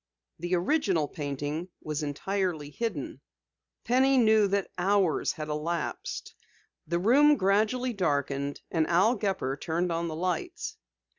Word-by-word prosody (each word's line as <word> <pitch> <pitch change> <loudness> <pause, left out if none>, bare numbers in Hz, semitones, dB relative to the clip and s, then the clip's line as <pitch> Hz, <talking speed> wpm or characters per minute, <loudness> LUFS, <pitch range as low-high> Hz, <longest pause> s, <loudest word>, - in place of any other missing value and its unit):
The 175 +2 0
original 180 - +1
painting 145 +4 -4
was 150 0 -3
entirely 155 0 -2
hidden. 160 - -4 0.6
Penny 265 +2 +3
knew 220 -3 +5
that 200 0 -1
hours 190 -2 +2
had 155 -1 -6
elapsed. 155 +3 -3 0.5
The 170 +2 0
room 280 +10 +5
gradually 215 +6 +1
darkened, 140 -6 -1
and 160 -2 +1
Al 190 +7 +4
Gepper 190 - -1
turned 170 +3 -1
on 170 +1 -1
the 160 - -4
lights. 180 +1 -3
175 Hz, 125 wpm, -28 LUFS, 150-205 Hz, 0.6 s, knew